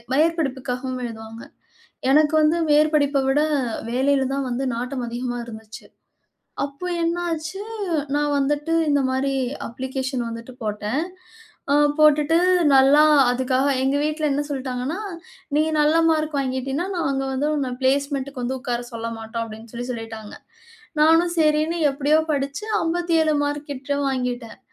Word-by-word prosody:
மேற்படிப்புக்காகவும் 265 Hz, -5 st, -1 dB
எழுதுவாங்க. 225 Hz, 0 st, -8 dB, 0.7 s
எனக்கு 305 Hz, +2 st, +4 dB
வந்து 310 Hz, +3 st, +3 dB
மேற்படிப்ப 295 Hz, -2 st, +3 dB
விட 290 Hz, +3 st, +3 dB, 0.5 s
வேலையில 265 Hz, +1 st, +2 dB
தான் 275 Hz, -1 st, -2 dB
வந்து 255 Hz, +3 st, -2 dB
நாட்டம் 250 Hz, +1 st, -3 dB
அதிகமா 245 Hz, 0 st, -3 dB
இருந்துச்சு. 220 Hz, -1 st, -10 dB, 0.8 s
அப்போ 280 Hz, +5 st, -6 dB, 0.2 s
என்னாச்சு, 335 Hz, +1 st, -2 dB, 0.5 s
நான் 290 Hz, 0 st, +1 dB
வந்துட்டு 295 Hz, +3 st, 0 dB, 0.2 s
இந்த 285 Hz, -1 st, +3 dB
மாரி 270 Hz, +1 st, 0 dB, 0.3 s
அப்ளிகேஷன் 260 Hz, 0 st, -3 dB
வந்துட்டு 230 Hz, +2 st, -8 dB
போட்டேன். 210 Hz, +7 st, -2 dB, 0.7 s
அ -, -, +4 dB, 0.2 s
போட்டுட்டு 305 Hz, +1 st, +5 dB, 0.4 s
நல்லா 275 Hz, +3 st, +6 dB, 0.3 s
அதுக்காக 260 Hz, +2 st, +1 dB
எங்க 270 Hz, +2 st, +1 dB
வீட்ல 305 Hz, 0 st, 0 dB
என்ன 285 Hz, +1 st, 0 dB
சொல்டாங்கன்னா, 260 Hz, +3 st, -3 dB, 0.6 s
நீ 305 Hz, -, +4 dB, 0.2 s
நல்ல 300 Hz, +2 st, +4 dB
மார்க் 310 Hz, -2 st, 0 dB
வாங்கிட்டின்னா, 270 Hz, +5 st, -2 dB
நாங்க 275 Hz, -5 st, 0 dB
வந்து 265 Hz, +3 st, 0 dB
உன்ன 280 Hz, -3 st, -1 dB
பிளேஸ்மெண்டுக்கு 275 Hz, 0 st, 0 dB
வந்து 260 Hz, +2 st, -2 dB
உட்கார 245 Hz, -2 st, -2 dB
சொல்ல 230 Hz, 0 st, -4 dB
மாட்டோம், 225 Hz, +1 st, -5 dB
அப்டின்னு 220 Hz, +1 st, -11 dB
சொல்லி 245 Hz, +1 st, -4 dB
சொல்லிட்டாங்க. 225 Hz, -2 st, -8 dB, 0.7 s
நானும் 330 Hz, +2 st, +4 dB
சரின்னு 310 Hz, +1 st, +2 dB
எப்டியோ 290 Hz, +3 st, +2 dB
படிச்சு 280 Hz, +6 st, -2 dB, 0.2 s
57 330 Hz, -2 st, +1 dB
மார்க் 290 Hz, +1 st, -3 dB
கிட்ட 280 Hz, +1 st, -3 dB
வாங்கிட்டேன். 250 Hz, -3 st, -3 dB
275 Hz, 125 wpm, -22 LUFS, 250-300 Hz, 0.8 s, நல்லா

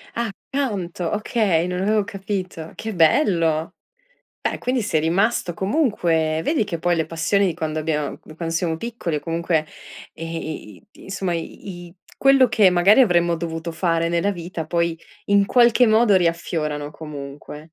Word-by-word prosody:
Ah, 235 Hz, -3 st, -1 dB, 0.2 s
canto 195 Hz, -11 st, -2 dB
okay, 205 Hz, -6 st, +1 dB
non 180 Hz, 0 st, -2 dB
avevo 210 Hz, +1 st, +2 dB
capito. 190 Hz, -5 st, -5 dB
Che 220 Hz, -1 st, -5 dB
bello! 165 Hz, -, +2 dB, 0.7 s
Beh, -, -, -1 dB
quindi 250 Hz, -1 st, -1 dB
sei 175 Hz, -7 st, 0 dB
rimasto 180 Hz, +2 st, +1 dB
comunque 170 Hz, -, +1 dB
vedi 300 Hz, -7 st, +1 dB
che 170 Hz, -5 st, -4 dB
poi 175 Hz, 0 st, +1 dB
le 160 Hz, -, 0 dB
passioni 170 Hz, +5 st, +1 dB
di 175 Hz, -, 0 dB
quando 155 Hz, 0 st, -3 dB
abbiam 150 Hz, -2 st, -2 dB
di 155 Hz, -, -13 dB
quando 165 Hz, 0 st, -4 dB
siamo 165 Hz, -1 st, 0 dB
piccoli 225 Hz, -7 st, -4 dB
o -, -, -4 dB
comunque, 165 Hz, -1 st, -1 dB, 0.5 s
ehm, 165 Hz, +1 st, -7 dB
i 155 Hz, -9 st, -6 dB
i -, -, -23 dB, 0.2 s
insomma 190 Hz, -2 st, -3 dB
i 175 Hz, +2 st, -7 dB
i 170 Hz, -, -18 dB, 0.2 s
quello 270 Hz, -1 st, +5 dB
che 215 Hz, -4 st, +5 dB
magari 185 Hz, +7 st, +5 dB
avremmo 175 Hz, -5 st, +3 dB
dovuto 165 Hz, 0 st, -4 dB
fare 165 Hz, -1 st, 0 dB
nella 170 Hz, +4 st, +1 dB
vita 170 Hz, -3 st, -6 dB
poi 170 Hz, 0 st, 0 dB, 0.3 s
in 200 Hz, 0 st, +4 dB
qualche 240 Hz, +1 st, +5 dB
modo 220 Hz, -2 st, +4 dB
riaffiorano 160 Hz, -4 st, -1 dB
comunque. 150 Hz, -1 st, -9 dB
175 Hz, 160 wpm, -22 LUFS, 165-205 Hz, 0.7 s, quello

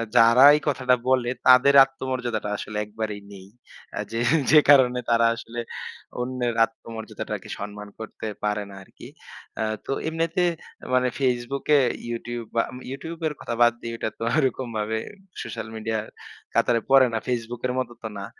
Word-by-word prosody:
যারা 115 Hz, +2 st, +7 dB
এই 150 Hz, -, -1 dB
কথাটা 130 Hz, -3 st, +2 dB
বলে 125 Hz, -2 st, +2 dB, 0.2 s
তাদের 130 Hz, +2 st, +7 dB
আত্মমর্যাদাটা 125 Hz, -5 st, -4 dB
আসলে 105 Hz, -, -6 dB
একবারেই 105 Hz, -1 st, -5 dB
নেই। 95 Hz, -1 st, -12 dB, 0.6 s
যে 115 Hz, -, -2 dB, 0.3 s
যে 155 Hz, -, +9 dB
কারণে 125 Hz, -3 st, +6 dB
তারা 115 Hz, 0 st, +4 dB
আসলে 120 Hz, +1 st, -7 dB, 0.6 s
অন্যের 125 Hz, -1 st, -2 dB
আত্মমর্যাদাটাকে 115 Hz, -1 st, -8 dB
সম্মান 105 Hz, 0 st, -7 dB
করতে 110 Hz, 0 st, -7 dB, 0.2 s
পারে 105 Hz, 0 st, 0 dB
না 100 Hz, -, -11 dB
আরকি। -, -, -14 dB, 0.5 s
আ -, -, +1 dB, 0.2 s
তো -, -, -4 dB, 0.2 s
এমনিতে 165 Hz, +2 st, 0 dB, 0.5 s
মানে 125 Hz, 0 st, +3 dB
Facebook 125 Hz, +1 st, -1 dB
এ -, -, +5 dB, 0.3 s
YouTube 120 Hz, 0 st, -5 dB
বা 115 Hz, -, +4 dB, 0.3 s
YouTube 165 Hz, +4 st, -7 dB
এর 150 Hz, -, -3 dB
কথা 120 Hz, -, -4 dB
বাদ 120 Hz, -1 st, +6 dB
দেই 115 Hz, -, -5 dB
ওটা 110 Hz, -, -2 dB
তো -, -, -4 dB
ওরকমভাবে 115 Hz, -5 st, -1 dB, 0.4 s
সোশ্যাল 110 Hz, -1 st, -6 dB
মিডিয়ার 110 Hz, 0 st, -3 dB, 0.5 s
কাতারে 115 Hz, -2 st, +2 dB
পড়ে 135 Hz, -2 st, +7 dB
না। -, -, +1 dB
Facebook 120 Hz, -1 st, -3 dB
এর 125 Hz, -, -2 dB
মতো 120 Hz, -2 st, -3 dB
তো 110 Hz, -, -2 dB
না। 100 Hz, -, -5 dB
120 Hz, 155 wpm, -24 LUFS, 110-130 Hz, 0.6 s, যে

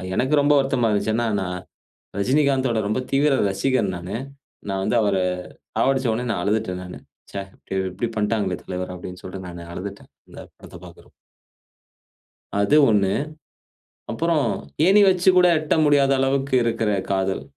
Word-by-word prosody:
எனக்கு 135 Hz, +7 st, +2 dB
ரொம்ப 145 Hz, +1 st, +4 dB
வருத்தமா 135 Hz, -4 st, +1 dB
இருந்துச்சு. 105 Hz, +1 st, 0 dB
என்னா, 120 Hz, 0 st, 0 dB
நான், 90 Hz, -1 st, -4 dB, 0.6 s
ரஜினிகாந்தோட 130 Hz, -1 st, +2 dB
ரொம்ப 110 Hz, +5 st, -1 dB
தீவிர 140 Hz, 0 st, +3 dB
ரசிகன் 110 Hz, -1 st, 0 dB
நானு. 90 Hz, +5 st, -5 dB, 0.5 s
நான் 95 Hz, -1 st, -2 dB
வந்து 120 Hz, -, +1 dB
அவர 100 Hz, -2 st, +1 dB, 0.6 s
சாவடிச்சோடனே 125 Hz, -3 st, +1 dB
நான் 90 Hz, -, -2 dB
அழுதுட்டேன் 100 Hz, -3 st, -1 dB
நானு. 90 Hz, -, -9 dB, 0.3 s
"ச்ச! -, -, -16 dB, 0.6 s
இப்டி 100 Hz, +6 st, -3 dB
பண்ணிட்டாங்களே 105 Hz, -4 st, 0 dB
தலைவர!" 90 Hz, 0 st, -5 dB
அப்டீன்னு 90 Hz, +1 st, -9 dB
சொல்ட்டு 95 Hz, 0 st, -8 dB
நான் 85 Hz, -1 st, -9 dB
அழுதுட்டேன். 100 Hz, +2 st, -8 dB, 0.2 s
இந்த -, -, -12 dB, 0.2 s
படத்த -, -, -12 dB
பாக்குறப்போ. -, -, -16 dB, 1.5 s
அது 120 Hz, +9 st, +3 dB
1. 100 Hz, -2 st, +2 dB, 1.0 s
அப்புறம் 160 Hz, +2 st, +1 dB, 0.4 s
ஏணி 200 Hz, +3 st, +6 dB
வச்சு 185 Hz, 0 st, +3 dB
கூட 180 Hz, 0 st, +6 dB
எட்ட 155 Hz, -, 0 dB
முடியாத 140 Hz, -2 st, +4 dB
அளவுக்கு 135 Hz, +1 st, 0 dB
இருக்குற 115 Hz, -2 st, 0 dB, 0.2 s
காதல். 95 Hz, -6 st, -1 dB
110 Hz, 135 wpm, -22 LUFS, 95-135 Hz, 1.5 s, ஏணி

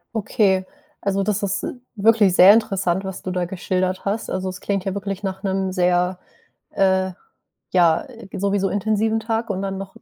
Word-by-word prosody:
Okay. 195 Hz, -3 st, +1 dB, 0.4 s
Also, 195 Hz, 0 st, 0 dB
das 210 Hz, 0 st, -1 dB
ist 200 Hz, 0 st, -1 dB, 0.3 s
wirklich 210 Hz, -3 st, +4 dB
sehr 190 Hz, +3 st, +9 dB
interessant, 195 Hz, -4 st, +1 dB
was 190 Hz, 0 st, -6 dB
du 185 Hz, -, -4 dB
da 180 Hz, -1 st, -1 dB
geschildert 185 Hz, +1 st, -2 dB
hast. 210 Hz, +3 st, -2 dB
Also, 185 Hz, 0 st, -2 dB
es 185 Hz, -, -7 dB
klingt 195 Hz, -2 st, -1 dB
ja 195 Hz, -, -1 dB
wirklich 200 Hz, 0 st, -4 dB
nach 190 Hz, 0 st, -4 dB
'nem 190 Hz, -1 st, -1 dB
sehr, 180 Hz, 0 st, +1 dB, 0.5 s
äh, 190 Hz, -1 st, +2 dB, 0.6 s
ja, 170 Hz, -3 st, +3 dB, 0.3 s
sowieso 200 Hz, 0 st, 0 dB
intensiven 220 Hz, +2 st, 0 dB
Tag 225 Hz, 0 st, -2 dB
und 195 Hz, -1 st, -2 dB
dann 195 Hz, -1 st, -3 dB
noch 195 Hz, 0 st, -8 dB
195 Hz, 170 wpm, -21 LUFS, 185-205 Hz, 0.6 s, sehr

